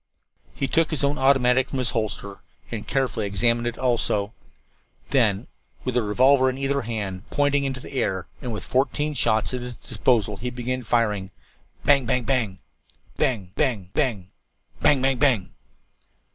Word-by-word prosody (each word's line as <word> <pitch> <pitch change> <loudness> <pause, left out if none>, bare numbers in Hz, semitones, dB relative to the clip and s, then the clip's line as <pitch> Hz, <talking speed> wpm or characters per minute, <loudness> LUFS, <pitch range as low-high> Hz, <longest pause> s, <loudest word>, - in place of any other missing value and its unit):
He 135 - -1
took 165 +2 +2
his 155 -3 -1
own 140 +1 +1
automatic 130 -1 +4
from 135 - -3
its 125 -2 0
holster 110 -3 -3 0.3
and 110 -3 -5
carefully 125 -6 0
examined 115 +4 +1
it 120 - -3
also. 115 -4 0 0.8
Then, 115 -4 +2 0.4
with 130 -1 -2
a 125 - +3
revolver 130 +5 +4
in 130 - -4
either 140 +1 0
hand, 105 -5 -4
pointing 145 0 +2
them 140 - 0
into 135 -1 -4
the - - -10
air 95 -8 -1 0.2
and 125 -4 -4
with 110 - -5
fourteen 145 +3 0
shots 110 -3 +1
at 125 - -2
his 125 0 -6
disposal, 110 -5 0
he 125 +4 -3
began 125 +1 -3
firing. 105 -5 0 0.6
Bang 140 -4 +4
Bang 125 0 +1
Bang! 115 -7 0 0.6
Bang! 100 -8 0
Bang! 100 -8 0
Bang! 100 -8 -1 0.5
Bang 135 -3 +3
Bang 135 -1 +2
Bang! 125 -10 +2
125 Hz, 160 wpm, -24 LUFS, 110-135 Hz, 0.8 s, automatic